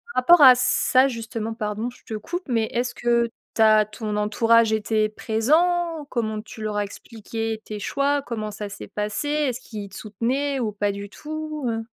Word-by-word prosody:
rapport 320 +6 +6
à 255 -2 +10
ça, 255 +1 +3
justement, 225 -2 -4
pardon, 215 +1 -3
je 250 - -17
te - - -8
coupe, 350 - -5
mais 230 -4 +1
est-ce 245 +2 -2
que 235 -1 +1 0.3
tu - - +1
as 215 -1 +6
ton 215 0 -5
entourage 225 +2 +3
était 215 0 +1
présent? 315 +10 +1
Comment 220 -4 -2
tu 220 +1 -11
leur 215 -1 -2
as 205 - +1
expliqué 225 +1 -6
tes 210 -1 -6
choix? 280 +6 0
Comment 220 -5 -5
ça 210 0 -6
s'est 200 - -9
passé? 210 +7 -3
Est-ce 290 -5 0
qu'ils 205 -5 -8
soutenaient, 255 +8 -2
ou 225 -4 -1
pas 205 0 -1
du 200 0 -7
tout, 305 +1 -6
heu 225 0 -3
225 Hz, 180 wpm, -23 LUFS, 215-260 Hz, 0.3 s, à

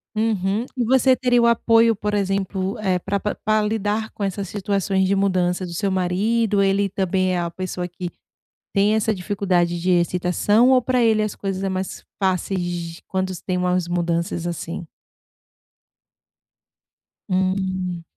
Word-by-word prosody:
Uhum. 215 0 0 0.2
Você 260 +1 +4
teria 245 -1 +2
o - - +4
apoio, 230 -1 +4
por 210 +1 -3
exemplo, 195 0 -1
eh, 190 -3 +1
pra 200 +3 -2
pra 210 - -2
pra 215 0 +1
lidar 215 +1 -1
com 205 - -6
essas 195 0 -2
situações 195 -1 0
de 200 - +2
mudança 185 -2 +1
do 175 - -7
seu 195 +3 -1
marido? 200 +4 +1
Ele 195 +1 +2
também 185 0 0
é - - 0
a 170 -1 -2
pessoa 180 0 -4
que 175 0 -6 0.6
tem 205 +1 +3
essa 220 0 +1
dificuldade 180 -3 0
de 180 +2 0
excitação, 180 +6 +3
ou 255 -1 +5
pra 250 0 +1
ele 220 -2 +3
as 215 -1 -2
coisas 195 -1 -3
é 195 - 0
mais 190 0 -4 0.2
fáceis, 190 0 0
de 175 -1 -5
quando 190 0 -2
se 180 - -11
tem 185 -1 -1
umas 180 -1 0
mudanças, 170 0 -1
assim? 170 0 -5 2.4
Hum. 185 -2 -1
190 Hz, 155 wpm, -22 LUFS, 180-210 Hz, 2.4 s, ou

